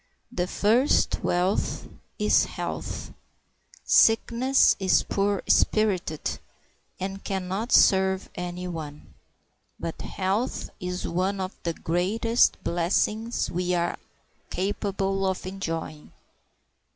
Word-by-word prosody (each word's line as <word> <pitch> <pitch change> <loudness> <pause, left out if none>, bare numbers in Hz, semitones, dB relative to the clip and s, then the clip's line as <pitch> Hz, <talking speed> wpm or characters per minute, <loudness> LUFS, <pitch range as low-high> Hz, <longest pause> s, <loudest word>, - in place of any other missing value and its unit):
The 180 0 -1
first 230 +9 +2
wealth 180 +3 0 0.3
is - - +3
health. - - -5 0.7
Sickness 235 +4 +4
is 190 -1 +3
poor 200 0 0
spirited, 190 -8 +1 0.6
and 195 +1 -5
can 190 -2 -3
not 205 +6 -3
serve 190 0 +4
any 180 0 -5
one; 155 -4 -8 0.7
but 165 - -5
health 195 +6 -2
is 180 0 -4
one 185 +3 -1
of 185 0 -3
the 170 - -2
greatest 215 +8 +1
blessings 210 +7 0
we 180 +1 0
are 170 0 -1 0.5
capable 195 0 -1
of 190 -1 -2
enjoying. 165 -5 -5
190 Hz, 100 wpm, -26 LUFS, 180-205 Hz, 0.7 s, Sickness